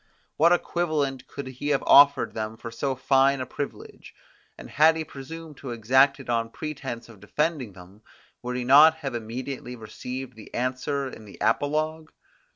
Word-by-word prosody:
What 165 Hz, +3 st, +4 dB
equivalent 150 Hz, -7 st, 0 dB
could 140 Hz, -, -7 dB
he 130 Hz, +2 st, -6 dB
have 145 Hz, -2 st, +1 dB
offered 140 Hz, -1 st, +6 dB
them 110 Hz, 0 st, -4 dB
for 115 Hz, 0 st, -8 dB
so 135 Hz, +3 st, -2 dB
fine 135 Hz, +1 st, +3 dB
a 130 Hz, -, -3 dB
privilege? 140 Hz, +3 st, -8 dB, 0.4 s
And -, -, -10 dB
had 160 Hz, +3 st, +4 dB
he 160 Hz, -, -2 dB
presumed 155 Hz, +1 st, -10 dB
to 135 Hz, -, -8 dB
exact 130 Hz, +5 st, +3 dB
it 135 Hz, -, -11 dB
on 115 Hz, -1 st, 0 dB
pretense 135 Hz, -4 st, -6 dB
of 115 Hz, -4 st, -15 dB
defending 130 Hz, -, -2 dB
them, 95 Hz, +3 st, -15 dB, 0.4 s
would 125 Hz, 0 st, -4 dB
he 125 Hz, -, -2 dB
not 150 Hz, +5 st, +7 dB
have 140 Hz, -5 st, -5 dB
immediately 125 Hz, +2 st, -5 dB
received 125 Hz, +3 st, -7 dB
the 110 Hz, -, -13 dB
answer 130 Hz, +3 st, -2 dB
in 110 Hz, -4 st, -10 dB
the 100 Hz, -, -13 dB
apologue? 155 Hz, +2 st, 0 dB
135 Hz, 165 wpm, -25 LUFS, 120-145 Hz, 0.4 s, not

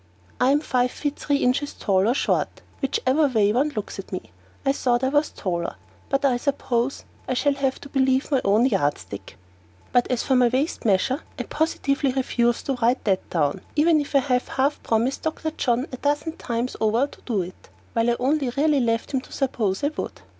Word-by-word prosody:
I 250 Hz, -, +4 dB
am 290 Hz, +2 st, +3 dB
five 250 Hz, -4 st, +1 dB
feet 290 Hz, +2 st, -3 dB
three 285 Hz, -, +1 dB
inches 270 Hz, +3 st, +1 dB
tall 195 Hz, -1 st, +2 dB
or 245 Hz, -, +2 dB
short, -, -, 0 dB, 0.2 s
whichever 270 Hz, +2 st, +2 dB
way 215 Hz, -5 st, +2 dB
one 275 Hz, +6 st, +2 dB
looks 210 Hz, -2 st, -4 dB
at 195 Hz, -, -8 dB
me. 185 Hz, -, -6 dB, 0.3 s
I 270 Hz, -, +4 dB
thought 245 Hz, -2 st, +1 dB
I 260 Hz, -, +3 dB
was 295 Hz, +2 st, +2 dB
taller, 175 Hz, -2 st, -3 dB, 0.3 s
but 275 Hz, +1 st, +1 dB
I 255 Hz, -3 st, +3 dB
suppose 250 Hz, -1 st, -1 dB, 0.2 s
I 255 Hz, -, 0 dB
shall 285 Hz, +3 st, +2 dB
have 275 Hz, -1 st, -1 dB
to -, -, -9 dB
believe 265 Hz, +1 st, +1 dB
my 270 Hz, -3 st, +3 dB
own 210 Hz, +5 st, +4 dB
yardstick. 145 Hz, -, -2 dB, 0.5 s
But 245 Hz, -1 st, +2 dB
as 250 Hz, -2 st, 0 dB
to 265 Hz, -, +2 dB
my 250 Hz, -1 st, +5 dB
waist 260 Hz, +5 st, -1 dB
measure, 225 Hz, -, +2 dB, 0.2 s
I -, -, -2 dB
positively 285 Hz, -3 st, 0 dB
refuse 240 Hz, -2 st, +1 dB
to 270 Hz, -2 st, -2 dB
write 240 Hz, +3 st, +2 dB
that 190 Hz, -3 st, 0 dB
down, 150 Hz, -4 st, 0 dB
even 310 Hz, +1 st, +4 dB
if 285 Hz, -, -6 dB
I 275 Hz, -, +6 dB
have 250 Hz, -2 st, 0 dB
half 275 Hz, +3 st, 0 dB
promised 235 Hz, +4 st, 0 dB
Dr. 315 Hz, 0 st, -2 dB
John 250 Hz, -4 st, 0 dB
a 255 Hz, -, -5 dB
dozen 290 Hz, +4 st, 0 dB
times 235 Hz, -2 st, -3 dB
over 225 Hz, +4 st, +3 dB
to 285 Hz, -, -14 dB
do 210 Hz, -7 st, -1 dB
it, 180 Hz, +2 st, -12 dB, 0.2 s
while 230 Hz, +1 st, +2 dB
I 240 Hz, -, +2 dB
only 275 Hz, +1 st, +1 dB
really 285 Hz, +3 st, +2 dB
left 230 Hz, +1 st, 0 dB
him 265 Hz, -, +1 dB
to -, -, -17 dB
suppose 220 Hz, -7 st, -1 dB
I 285 Hz, -, +3 dB
would. 305 Hz, -, -6 dB
255 Hz, 205 wpm, -24 LUFS, 230-280 Hz, 0.5 s, I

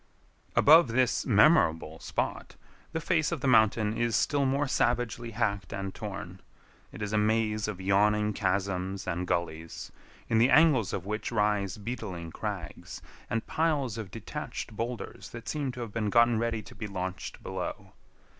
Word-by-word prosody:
Above 160 Hz, +1 st, +7 dB
this 125 Hz, +1 st, +1 dB
memorable 100 Hz, -, +4 dB
spot, -, -, -3 dB, 0.4 s
the 160 Hz, -, -2 dB
face 160 Hz, -1 st, +1 dB
of -, -, -3 dB
the 140 Hz, -, 0 dB
mountain 110 Hz, -2 st, +4 dB
is 120 Hz, -1 st, 0 dB
still 140 Hz, -2 st, +2 dB
more 140 Hz, +2 st, +1 dB
savagely 120 Hz, -2 st, 0 dB
hacked 105 Hz, -5 st, -1 dB
and 95 Hz, -1 st, -4 dB
torn. 95 Hz, -4 st, -7 dB, 0.5 s
It 105 Hz, -, -7 dB
is 105 Hz, 0 st, -3 dB
a 105 Hz, -, +3 dB
maze 110 Hz, 0 st, +1 dB
of 105 Hz, -3 st, -4 dB
yawning 105 Hz, +2 st, +2 dB
chasms 95 Hz, -1 st, -1 dB
and 90 Hz, +1 st, -2 dB
gullies, 85 Hz, -2 st, -3 dB, 0.4 s
in 110 Hz, -, +2 dB
the 120 Hz, +3 st, +5 dB
angles 145 Hz, -, +5 dB
of 95 Hz, -, -4 dB
which 105 Hz, +2 st, -3 dB
rise 105 Hz, -3 st, +1 dB
beetling 100 Hz, -7 st, -5 dB
crags -, -, -6 dB, 0.3 s
and 115 Hz, 0 st, -1 dB
piles 150 Hz, -8 st, 0 dB
of 105 Hz, -4 st, -6 dB
detached 105 Hz, -, -6 dB
boulders 115 Hz, -4 st, -5 dB
that 120 Hz, +3 st, -10 dB
seem 145 Hz, -4 st, -2 dB
to 125 Hz, -, -7 dB
have 115 Hz, -3 st, -6 dB
been 110 Hz, -2 st, -1 dB
gotten 120 Hz, +1 st, +4 dB
ready 115 Hz, -2 st, -1 dB
to -, -, -12 dB
be 105 Hz, -, -6 dB
launched 95 Hz, -1 st, -5 dB
below. -, -, -5 dB
110 Hz, 160 wpm, -29 LUFS, 100-120 Hz, 0.5 s, Above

